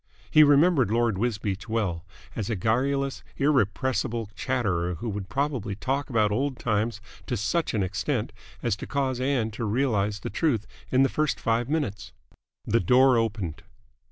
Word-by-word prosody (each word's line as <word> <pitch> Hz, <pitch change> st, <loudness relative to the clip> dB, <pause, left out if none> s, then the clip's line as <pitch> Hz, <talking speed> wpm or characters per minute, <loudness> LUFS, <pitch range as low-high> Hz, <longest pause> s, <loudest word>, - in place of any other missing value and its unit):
He 155 Hz, -, +7 dB
remembered 145 Hz, -, +5 dB
Lord 115 Hz, -3 st, +1 dB
Wisbeach 110 Hz, -2 st, -2 dB
well, 100 Hz, -7 st, -1 dB, 0.3 s
as 110 Hz, -2 st, -3 dB
a 115 Hz, -, 0 dB
garrulous, 135 Hz, +7 st, 0 dB
irrepressible 125 Hz, -4 st, 0 dB
chatterer 95 Hz, -10 st, -1 dB
who 100 Hz, -, -6 dB
would 100 Hz, -2 st, -4 dB
probably 130 Hz, -7 st, -1 dB
talk 135 Hz, +6 st, -2 dB
about 110 Hz, -4 st, +2 dB
old 130 Hz, +4 st, -1 dB
times 110 Hz, 0 st, -1 dB, 0.3 s
to 125 Hz, -, -1 dB
such 150 Hz, +8 st, 0 dB
an 105 Hz, -, +1 dB
extent 95 Hz, +1 st, -2 dB, 0.3 s
as -, -, +1 dB
to -, -, -7 dB
cause 130 Hz, -3 st, -1 dB
Ann 130 Hz, -5 st, 0 dB
to 110 Hz, -, -5 dB
realise 105 Hz, -3 st, +1 dB
the -, -, -5 dB
truth 115 Hz, -3 st, 0 dB, 0.2 s
in 130 Hz, +1 st, +4 dB
the -, -, +4 dB
first 155 Hz, +2 st, -1 dB
five 115 Hz, +2 st, 0 dB
minutes. 110 Hz, -9 st, -2 dB, 0.5 s
The 115 Hz, +2 st, +2 dB
door 130 Hz, +1 st, +5 dB
opened. 105 Hz, -8 st, -1 dB
115 Hz, 155 wpm, -26 LUFS, 105-135 Hz, 0.5 s, He